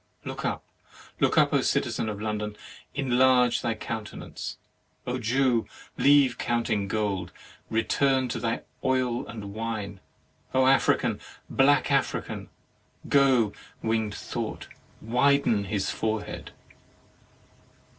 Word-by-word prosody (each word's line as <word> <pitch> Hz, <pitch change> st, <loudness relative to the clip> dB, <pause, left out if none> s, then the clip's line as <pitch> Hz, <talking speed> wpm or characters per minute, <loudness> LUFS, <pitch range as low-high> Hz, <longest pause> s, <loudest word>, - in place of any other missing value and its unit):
Look -, -, -5 dB
up! -, -, -2 dB, 0.6 s
look -, -, +2 dB
up! -, -, +5 dB
citizen 110 Hz, -, 0 dB
of 105 Hz, -1 st, -5 dB
London, 105 Hz, -1 st, -3 dB, 0.4 s
enlarge 125 Hz, -2 st, +3 dB
thy 115 Hz, -2 st, -1 dB
countenance! 110 Hz, -1 st, -6 dB, 0.5 s
O 125 Hz, +1 st, -2 dB
Jew, 120 Hz, 0 st, +2 dB, 0.3 s
leave 140 Hz, -3 st, +4 dB
counting 115 Hz, -4 st, 0 dB
gold; 100 Hz, -4 st, -1 dB, 0.4 s
return 130 Hz, +3 st, +2 dB
to -, -, -2 dB
thy 115 Hz, -1 st, -1 dB, 0.2 s
oil 130 Hz, -2 st, 0 dB
and 100 Hz, -3 st, -7 dB
wine! 110 Hz, -3 st, -4 dB, 0.6 s
African, 130 Hz, +1 st, +3 dB, 0.3 s
black 145 Hz, +2 st, +4 dB
African! 140 Hz, -1 st, -1 dB, 0.6 s
(Go, 130 Hz, -7 st, +4 dB, 0.3 s
winged 110 Hz, -2 st, 0 dB
thought, -, -, -5 dB, 0.4 s
widen 125 Hz, -2 st, +3 dB
his 100 Hz, -1 st, -1 dB
forehead.) 110 Hz, -1 st, -3 dB
115 Hz, 100 wpm, -27 LUFS, 105-130 Hz, 0.6 s, up